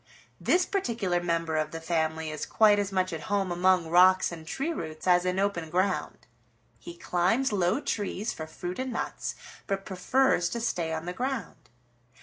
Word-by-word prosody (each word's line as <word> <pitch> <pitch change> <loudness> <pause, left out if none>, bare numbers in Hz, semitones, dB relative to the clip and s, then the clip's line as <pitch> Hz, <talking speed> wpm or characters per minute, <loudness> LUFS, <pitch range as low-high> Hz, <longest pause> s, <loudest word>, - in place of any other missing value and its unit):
This 360 +1 +3
particular 225 - -1
member 165 -2 -1
of 155 -1 0
the 165 - -6
family 160 -1 -1
is 155 - -5
quite 210 -2 +5
as 200 -1 -1
much 185 -2 0
at 160 - -5
home 200 -3 0
among 180 -1 +3
rocks 185 +3 +5
and 160 -2 -9
tree 280 - -2
roots 155 - -6
as 180 -1 +4
in 180 0 0
open 195 -5 -1
ground. 185 +3 -1 0.5
He 345 0 -10
climbs 220 - +1
low 185 +4 +2
trees 210 -4 -2
for 160 - -7
fruit 175 +4 -6
and 260 0 -2
nuts, - - -4 0.3
but 195 -1 -2
prefers 190 0 +2
to 235 - -3
stay 175 -8 -1
on 160 0 -3
the 180 - -4
ground. 250 -1 -4
185 Hz, 175 wpm, -28 LUFS, 165-210 Hz, 0.5 s, quite